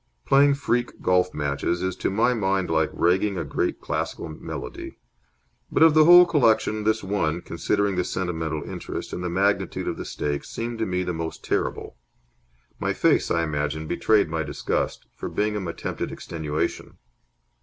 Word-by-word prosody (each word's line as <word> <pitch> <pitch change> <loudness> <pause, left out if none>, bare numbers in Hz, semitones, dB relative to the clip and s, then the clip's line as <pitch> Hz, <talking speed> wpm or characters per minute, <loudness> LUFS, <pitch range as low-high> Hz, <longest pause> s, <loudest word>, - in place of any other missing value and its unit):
Playing 140 +1 +5
freak 125 -3 -1
golf 90 0 +3
matches 75 +4 -2
is 95 -1 -1
to - - -1
my 115 +6 +2
mind 95 -5 0
like 80 -1 +2
ragging 95 +3 +1
a 85 - -1
great 70 - -1
classical - - -3
melody. 75 - -7 0.7
But - - +4
of 160 -1 +7
the 155 0 +6
whole 175 +1 +9
collection 110 -8 +2
this 110 0 +1
one, 85 -4 -1
considering 100 +1 -1
the 90 - +2
sentimental 80 -5 -3
interest - - -6
and 90 - -4
the 90 - -2
magnitude 100 +3 0
of - - -2
the - - -6
stakes, 75 -1 -3
seemed 115 0 -4
to 110 - 0
me 90 0 -1
the 90 -1 -2
most 80 0 -5
terrible. - - -2 0.8
My - - 0
face, - - +2
I 85 - +1
imagine, 75 0 -2
betrayed 105 +5 +2
my 80 0 -2
disgust, 75 -2 -2
for - - -6
Bingham 105 -3 -1
attempted 85 - -4
extenuation. 75 -2 -4
90 Hz, 165 wpm, -24 LUFS, 80-110 Hz, 0.8 s, whole